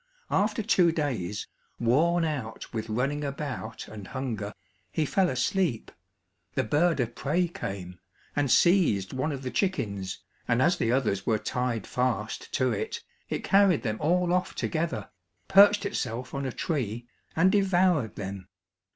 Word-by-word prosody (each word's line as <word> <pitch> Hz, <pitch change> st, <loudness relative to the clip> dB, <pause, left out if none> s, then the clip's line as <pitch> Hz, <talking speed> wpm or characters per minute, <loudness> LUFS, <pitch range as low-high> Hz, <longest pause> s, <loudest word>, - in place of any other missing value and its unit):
After 210 Hz, +3 st, +1 dB
two 180 Hz, -5 st, +4 dB
days, 120 Hz, -, -2 dB, 0.3 s
worn 165 Hz, +9 st, +3 dB
out 130 Hz, -8 st, -4 dB
with 110 Hz, -1 st, -3 dB
running 135 Hz, +6 st, -1 dB
about 140 Hz, -6 st, -5 dB
and 105 Hz, -3 st, -9 dB
hunger, 115 Hz, -6 st, -4 dB, 0.4 s
he 155 Hz, -, 0 dB
fell 185 Hz, +4 st, +2 dB
asleep; 145 Hz, -, 0 dB, 0.6 s
the -, -, +2 dB
bird 155 Hz, +6 st, +2 dB
of 120 Hz, -2 st, -1 dB
prey 170 Hz, +8 st, 0 dB
came, 95 Hz, -, -6 dB, 0.4 s
and 145 Hz, -2 st, +1 dB
seized 150 Hz, -, +4 dB
one 130 Hz, +4 st, -1 dB
of 135 Hz, -2 st, -5 dB
the 130 Hz, -, -3 dB
chickens, 100 Hz, -, -1 dB, 0.3 s
and 120 Hz, 0 st, +2 dB
as 175 Hz, +7 st, +3 dB
the 115 Hz, -, +1 dB
others 110 Hz, -7 st, 0 dB
were 110 Hz, -2 st, +3 dB
tied 125 Hz, -1 st, -2 dB
fast 125 Hz, -2 st, -2 dB
to 130 Hz, -1 st, +2 dB
it, 105 Hz, -, -3 dB, 0.3 s
it -, -, -3 dB
carried 195 Hz, -5 st, +4 dB
them 110 Hz, -3 st, -1 dB
all 175 Hz, +2 st, +2 dB
off 180 Hz, 0 st, 0 dB
together, 160 Hz, -, -2 dB, 0.4 s
perched 200 Hz, +1 st, +6 dB
itself 125 Hz, -, -3 dB
on 140 Hz, -1 st, -2 dB
a -, -, -2 dB
tree, 120 Hz, -, -3 dB, 0.3 s
and 185 Hz, +4 st, +4 dB
devoured 185 Hz, -, +2 dB
them. 95 Hz, -2 st, -6 dB
135 Hz, 150 wpm, -28 LUFS, 110-175 Hz, 0.6 s, perched